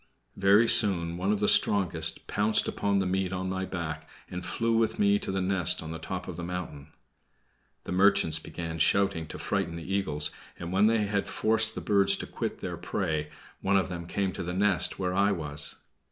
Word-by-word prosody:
Very 100 +4 +4
soon 85 -7 +3
one 95 +3 -1
of 105 -1 -1
the 105 - +2
strongest 85 -5 +2
pounced 105 +1 +1
upon 100 -1 0
the 95 - +1
meat 95 0 -1
on 95 0 -3
my 95 0 -2
back, 85 -5 -5 0.2
and 90 0 -5
flew 115 +4 -1
with 115 0 +1
me 100 0 +3
to - - -4
its 95 0 -1
nest 90 -2 +1
on 80 - -7
the 80 - -6
top 90 +3 -5
of 90 - -7
the 85 - -5
mountain. 85 -5 -6 1.0
The - - -7
merchants 95 -3 +3
began 80 -1 -6
shouting 95 -1 +2
to - - -7
frighten 85 - -2
the 85 - -7
eagles, 75 -7 0 0.3
and 85 0 -6
when 100 +2 +4
they 110 -1 +2
had 100 -1 -1
forced 110 0 +1
the - - -4
birds 100 -2 +3
to - - -5
quit - - -5
their - - -5
prey, 75 -1 -2 0.3
one 100 +1 +2
of 95 -1 0
them 85 -2 -6
came 95 +1 -1
to - - -6
the 90 +1 -4
nest 95 -2 +2
where 90 -1 -2
I 100 +2 +3
was. 75 -5 -1
95 Hz, 205 wpm, -28 LUFS, 85-100 Hz, 1.0 s, Very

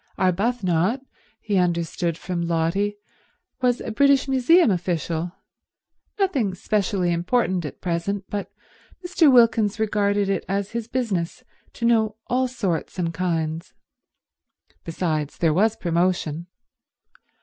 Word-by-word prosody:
Arbuthnot, 195 +3 +1 0.3
he 205 -3 -1
understood 170 -1 0
from 175 0 -4
Lotty, 170 +5 0 0.6
was 245 -1 +2
a - - -5
British 280 +3 +3
Museum 270 - +4
official—nothing 180 - -3
specially 190 -2 0
important 185 0 0
at 145 - -8
present, 185 +3 -2
but 205 -1 -4 0.5
Mr. 340 -4 +4
Wilkins 225 -4 +4
regarded 205 -2 +1
it 195 -2 -1
as 200 0 -1
his 230 -1 -4
business 230 -4 -2 0.3
to 235 - -3
know 220 -2 +3
all 255 +1 +1
sorts 200 -12 -3
and 170 -2 -1
kinds. 165 -1 -2 1.1
Besides, 160 -3 -2
there 165 -3 +2
was 215 +6 +2
promotion. 170 -2 -1
195 Hz, 110 wpm, -23 LUFS, 170-230 Hz, 1.1 s, Museum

